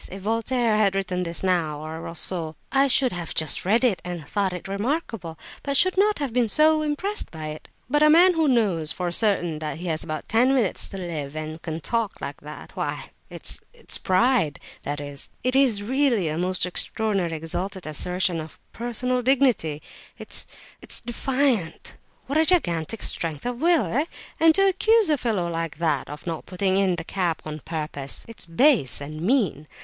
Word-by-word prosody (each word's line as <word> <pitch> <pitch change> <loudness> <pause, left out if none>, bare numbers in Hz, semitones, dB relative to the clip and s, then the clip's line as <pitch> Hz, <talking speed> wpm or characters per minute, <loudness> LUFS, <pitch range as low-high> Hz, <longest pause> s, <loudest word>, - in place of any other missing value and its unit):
If 190 0 -8
Voltaire 230 +1 +1
had 200 -2 +3
written 185 -2 -1
this 170 0 -3
now, 170 -5 0
or 160 +1 -6
Rousseau, 165 -1 0 0.2
I 275 0 +4
should 260 -1 +3
have 175 -2 -5
just 160 +1 0
read 220 +6 +3
it 230 -7 +2
and 175 -5 -6
thought 200 0 0
it 180 0 -6
remarkable, 205 - -3 0.2
but 280 -1 0
should 370 +4 +3
not 415 +2 +3
have 280 -5 -3
been 240 -2 +2
so 310 +4 +5
impressed 310 +8 -2
by 155 -2 -6
it. 155 0 -8 0.2
But 295 +4 +1
a 305 - +7
man 350 +4 +7
who 325 -2 +2
knows 200 - +2
for 180 -1 -3
certain 175 -5 +1
that 155 0 -4
he 175 - -7
has 160 -1 0
but 155 -1 -5
ten 250 +5 +3
minutes 225 -8 +1
to 195 - -7
live 155 -6 -5
and 155 +1 -5
can 160 -1 -5
talk 230 +1 -2
like - - -6
that—why—it's—it's 480 -1 -5
pride, 185 - +2 0.2
that 145 0 -4
is! 145 -1 -6
It 255 +1 +1
is 250 -7 +3
really 240 - +1
a 155 - -2
most 180 +1 -1
extraordinary, 190 -1 +1
exalted 175 +4 -4
assertion 180 +3 -1
of 155 - -11
personal 250 +2 -1
dignity, 245 - +2 0.3
it's—it's - - -4
defiant! 240 - -1 0.3
What 280 +4 0
a 320 - +6
gigantic 205 - +2
strength 160 0 -1
of 245 +1 -3
will, 340 -1 +4
eh? 285 +6 0 0.3
And 320 0 +6
to 390 0 +5
accuse 425 0 +3
a 300 - +3
fellow 210 -8 0
like 165 -2 -3
that 155 -5 0
of 150 0 -9
not 165 -2 -5
putting 190 +1 0
in 190 -2 +2
the 165 - -5
cap 175 -2 -2
on 155 0 -5
purpose; 150 -3 -2
it's 230 -5 -6
base 205 - +4
and 155 +2 -7
mean! 185 - +1
195 Hz, 180 wpm, -24 LUFS, 165-255 Hz, 0.3 s, a